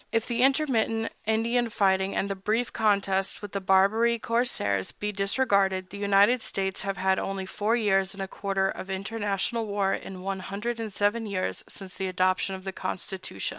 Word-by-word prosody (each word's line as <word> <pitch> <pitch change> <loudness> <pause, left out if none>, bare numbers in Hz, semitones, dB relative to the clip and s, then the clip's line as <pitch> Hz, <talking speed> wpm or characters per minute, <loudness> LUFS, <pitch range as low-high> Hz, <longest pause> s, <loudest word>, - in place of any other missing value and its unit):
If 225 0 +1
the 240 0 -1
intermittent 255 -5 +2 0.2
Indian 230 +2 +2
fighting 190 -2 +2
and 195 - 0
the 200 - -1
brief 215 +5 -1
contest 200 -2 +1
with 205 - -6
the 200 - -3
Barbary 200 +5 +4
corsairs 225 - 0
be 210 0 -4
disregarded, 195 -2 +1
the 200 - -7
United 205 +4 +4
States 190 -3 -2
have 195 -1 -3
had 190 +1 +2
only 195 -1 -3
four 210 +4 0
years 195 -4 +2
and 195 - -4
a - - -4
quarter 195 0 -1
of 195 - -5
international 205 +3 -2
war 200 -1 +1
in - - -5
the 185 - -8
one 195 0 -3
hundred 210 +5 -4
and 220 -2 -4
seven 210 +3 0
years 190 -2 -2
since 190 -2 -8
the 190 0 -2
adoption 185 +1 +1
of 190 - -9
the 190 - -4
Constitution. 185 - -4
200 Hz, 185 wpm, -27 LUFS, 190-225 Hz, 0.2 s, Barbary